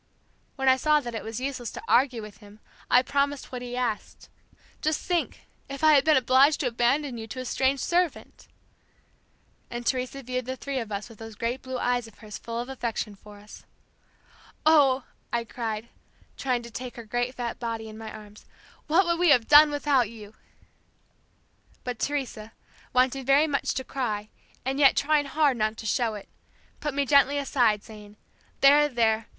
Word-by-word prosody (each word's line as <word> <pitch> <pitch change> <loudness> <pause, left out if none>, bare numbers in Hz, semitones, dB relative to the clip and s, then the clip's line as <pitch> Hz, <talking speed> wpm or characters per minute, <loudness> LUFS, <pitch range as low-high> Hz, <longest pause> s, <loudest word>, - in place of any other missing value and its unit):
"When 270 -1 -2
I 260 0 +6
saw 300 +2 +3
that 240 -4 -7
it 225 - -5
was 225 +1 -5
useless 255 -3 -4
to - - -7
argue 250 -3 +2
with 210 -1 -11
him 205 +1 -16 0.3
I 250 - +5
promised 280 +1 -1
what 250 -1 -5
he 245 0 -6
asked. 240 -4 -4 0.5
Just 310 0 0
think, 350 -2 -2 0.3
if 275 +2 -7
I 310 -1 +7
had 280 - +5
been 310 -2 +4
obliged 265 +4 +4
to - - -1
abandon 245 +2 0
you 220 - -7
to 255 - -7
a 255 - -5
strange 265 +2 +1
servant!" 350 +1 -1 1.2
and 240 0 -6
Teresa 260 +2 -2
viewed 255 0 -4
the 260 - -3
three 275 +1 -3
of 225 -3 -6
us 200 +1 -4
with 230 -3 -15
those 225 -1 -9
great 235 +4 -3
blue 260 -1 -5
eyes 245 -1 0
of 225 - -17
hers 210 -1 -9
full 230 0 -5
of 240 - -4
affection 235 -5 -4
for 205 +1 -15
us. 210 +1 -14 1.0
"Oh," 280 -4 +5 0.3
I 235 0 0
cried, 225 -1 -5 0.5
trying 250 -3 -1
to 235 - -10
take 250 +2 -7
her 235 - -9
great 245 +3 -2
fat 240 -2 -4
body 230 -2 -4
in 215 - -10
my 220 0 -8
arms, 210 -1 -13 0.4
"What 345 +5 +4
would 340 0 0
we 355 -1 +4
have 245 -6 +4
done 300 +1 +8
without 285 -5 +1
you!" 215 -2 -12 1.5
But 245 -3 -5
Teresa, 250 -7 -3 0.4
wanting 255 +2 +2
very 275 +4 +4
much 285 -3 -1
to 260 - -2
cry 215 -6 -3 0.4
and 270 +2 -1
yet 275 -2 +6
trying 295 0 +2
hard 280 -2 +2
not 215 0 -1
to - - -8
show 225 +1 0
it, 205 - -9 0.5
put 295 -3 -3
me 285 0 +1
gently 280 0 +4
aside, 240 -7 +1
saying, 210 -1 -13 0.4
"There, 290 +2 +6
there! 225 -3 +1
250 Hz, 185 wpm, -26 LUFS, 225-280 Hz, 1.5 s, done